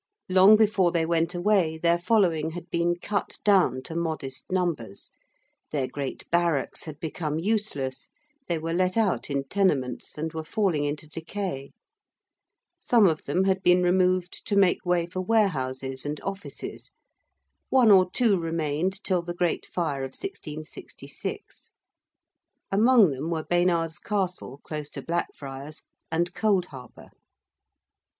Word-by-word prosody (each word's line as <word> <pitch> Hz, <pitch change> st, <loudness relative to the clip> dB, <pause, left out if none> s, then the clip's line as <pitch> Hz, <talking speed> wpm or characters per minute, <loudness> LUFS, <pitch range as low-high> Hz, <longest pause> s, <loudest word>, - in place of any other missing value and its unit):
Long 190 Hz, +3 st, +7 dB
before 210 Hz, -5 st, +3 dB
they 165 Hz, -2 st, +1 dB
went 165 Hz, +1 st, 0 dB
away 175 Hz, -3 st, +2 dB
their 170 Hz, +1 st, +2 dB
following 175 Hz, -5 st, +2 dB
had 175 Hz, 0 st, -8 dB
been 170 Hz, 0 st, +1 dB
cut 200 Hz, +3 st, -3 dB
down 180 Hz, -, +3 dB
to 160 Hz, -, -8 dB
modest 160 Hz, -5 st, -3 dB
numbers: 165 Hz, -, -2 dB, 0.6 s
their 140 Hz, -4 st, -1 dB
great 140 Hz, -1 st, -6 dB
barracks 170 Hz, -4 st, +1 dB
had 155 Hz, -2 st, -8 dB
become 155 Hz, -1 st, -3 dB
useless: 160 Hz, -9 st, -2 dB, 0.4 s
they 170 Hz, -, 0 dB
were 165 Hz, +1 st, -3 dB
let 185 Hz, +3 st, +1 dB
out 210 Hz, -8 st, +1 dB
in 140 Hz, -1 st, -1 dB
tenements, 135 Hz, -9 st, 0 dB
and 160 Hz, +1 st, -3 dB
were 160 Hz, 0 st, -4 dB
falling 165 Hz, -4 st, 0 dB
into 145 Hz, +1 st, -3 dB
decay: 160 Hz, -2 st, -5 dB, 1.1 s
some 235 Hz, -4 st, +4 dB
of 160 Hz, -4 st, +1 dB
them 175 Hz, +7 st, +1 dB
had 190 Hz, 0 st, +1 dB
been 180 Hz, 0 st, +4 dB
removed 180 Hz, 0 st, +1 dB
to 205 Hz, -, 0 dB
make 195 Hz, -3 st, +3 dB
way 175 Hz, -1 st, +2 dB
for 180 Hz, +2 st, -4 dB
warehouses 135 Hz, -, 0 dB
and 145 Hz, +1 st, -4 dB
offices: 195 Hz, +1 st, -6 dB, 0.8 s
one 250 Hz, -5 st, +5 dB
or 185 Hz, -2 st, +6 dB
two 210 Hz, -3 st, +2 dB
remained 165 Hz, +4 st, -1 dB
till 185 Hz, -3 st, +1 dB
the 175 Hz, 0 st, -6 dB
Great 175 Hz, -1 st, -1 dB
Fire 155 Hz, -6 st, -2 dB
of 135 Hz, -, -6 dB
1666. 155 Hz, -, -8 dB, 1.0 s
Among 215 Hz, -, +5 dB
them 140 Hz, +4 st, -4 dB
were 160 Hz, -2 st, -2 dB
Baynard's 170 Hz, -2 st, +1 dB
Castle, 180 Hz, -9 st, -3 dB
close 150 Hz, -2 st, -5 dB
to -, -, -8 dB
Blackfriars, 145 Hz, -3 st, -5 dB, 0.3 s
and 170 Hz, +2 st, 0 dB
Cold 200 Hz, -5 st, +2 dB
Harbour. 130 Hz, -7 st, -12 dB
170 Hz, 140 wpm, -26 LUFS, 150-190 Hz, 1.1 s, Long